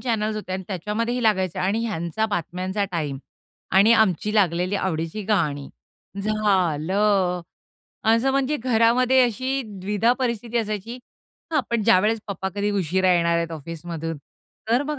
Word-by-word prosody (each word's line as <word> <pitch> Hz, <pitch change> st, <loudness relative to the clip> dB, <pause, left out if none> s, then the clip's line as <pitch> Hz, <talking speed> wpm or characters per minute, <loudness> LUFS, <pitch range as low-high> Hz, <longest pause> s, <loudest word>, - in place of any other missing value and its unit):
Channels 220 Hz, -3 st, -1 dB
होते 205 Hz, -3 st, -5 dB
आणि 190 Hz, 0 st, -3 dB
त्याच्यामध्येही 215 Hz, +6 st, -2 dB
लागायचे 190 Hz, -6 st, +1 dB
आणि 200 Hz, +4 st, 0 dB
ह्यांचा 200 Hz, +1 st, -2 dB
बातम्यांचा 185 Hz, +1 st, -2 dB
टाईम 150 Hz, -5 st, -2 dB, 0.6 s
आणि 210 Hz, +4 st, +6 dB
आमची 210 Hz, -2 st, +2 dB
लागलेली 185 Hz, -1 st, +2 dB
आवडीची 165 Hz, +2 st, -2 dB
गाणी, 150 Hz, -9 st, 0 dB, 0.5 s
झालं. 190 Hz, -2 st, +1 dB, 0.7 s
असं 230 Hz, +4 st, +3 dB
म्हणजे 275 Hz, +2 st, +1 dB
घरामध्ये 250 Hz, +1 st, +3 dB
अशी 260 Hz, +3 st, -1 dB, 0.2 s
द्विधा 210 Hz, +5 st, +2 dB
परिस्थिती 235 Hz, -2 st, -1 dB
असायची. 215 Hz, +2 st, -4 dB, 0.5 s
हां, 305 Hz, -, +3 dB
पण 235 Hz, -2 st, +1 dB
ज्यावेळेस 215 Hz, +1 st, +3 dB
पप्पा 190 Hz, -1 st, -3 dB
कधी 205 Hz, 0 st, 0 dB
उशिरा 185 Hz, -1 st, +2 dB
येणार 170 Hz, -1 st, +2 dB
आहेत 170 Hz, 0 st, -1 dB
ऑफिसमधून, 165 Hz, +1 st, -6 dB, 0.5 s
तर 245 Hz, +4 st, +3 dB
मग 295 Hz, 0 st, -4 dB
205 Hz, 130 wpm, -23 LUFS, 180-230 Hz, 0.7 s, आणि